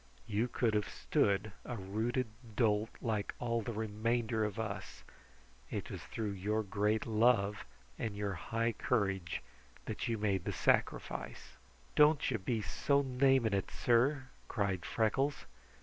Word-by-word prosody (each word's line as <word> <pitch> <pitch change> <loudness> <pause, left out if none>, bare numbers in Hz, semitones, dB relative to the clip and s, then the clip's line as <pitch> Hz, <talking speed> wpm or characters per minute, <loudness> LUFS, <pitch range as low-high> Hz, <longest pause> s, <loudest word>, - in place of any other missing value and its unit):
You 110 +2 0
could 120 -2 +1
have 105 -1 +1
stood 100 +1 +1
a 120 - -5
rooted 110 +6 -1 0.3
dolt 110 -2 +2
like 110 -4 -1
all 115 -1 0
the 115 - -4
remainder 110 +1 0
of 105 0 -2
us. 110 -3 -5 0.7
It - - -4
was - - -5
through 110 -2 -3
your 105 +3 -1
great 105 +1 +1
love 110 -3 +3 0.3
and 110 -3 -2
your 100 -1 -2
high 115 +7 -1
courage 95 -7 0 0.4
that - - -3
you 115 - 0
made 100 -4 0
the - - -1
sacrifice." - - 0 0.4
"Don't 150 -2 +5
you 115 - 0
be 110 +3 -1
so 140 +5 +2
naming 130 -3 +3
it, 100 -1 0
sir!" 130 +4 +2 0.2
cried 95 -6 -1
Freckles. 135 +6 0
110 Hz, 140 wpm, -34 LUFS, 100-120 Hz, 0.7 s, Don't